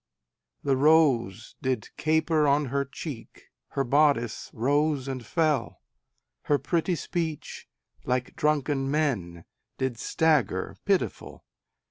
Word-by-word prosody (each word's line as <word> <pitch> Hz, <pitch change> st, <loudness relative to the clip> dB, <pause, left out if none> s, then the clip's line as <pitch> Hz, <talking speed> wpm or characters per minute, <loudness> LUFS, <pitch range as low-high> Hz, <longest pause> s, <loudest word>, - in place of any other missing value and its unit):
The 140 Hz, -1 st, +2 dB
rose 130 Hz, -8 st, +3 dB
did 130 Hz, -4 st, -2 dB
caper 155 Hz, -1 st, +2 dB
on 145 Hz, +1 st, +3 dB
her 140 Hz, 0 st, +1 dB
cheek, 135 Hz, -3 st, -9 dB, 0.2 s
Her 135 Hz, -, -1 dB
bodice 135 Hz, -4 st, +2 dB
rose 145 Hz, +3 st, +1 dB
and 130 Hz, -2 st, -4 dB
fell, 155 Hz, -5 st, 0 dB, 0.7 s
Her 145 Hz, -, +3 dB
pretty 170 Hz, +3 st, 0 dB
speech, 160 Hz, -1 st, -4 dB, 0.4 s
like 125 Hz, 0 st, -2 dB
drunken 145 Hz, -2 st, 0 dB
men, 110 Hz, -, -1 dB, 0.3 s
Did 130 Hz, -3 st, -2 dB
stagger 155 Hz, -3 st, +1 dB
pitiful. -, -, -1 dB
140 Hz, 105 wpm, -27 LUFS, 125-155 Hz, 0.7 s, rose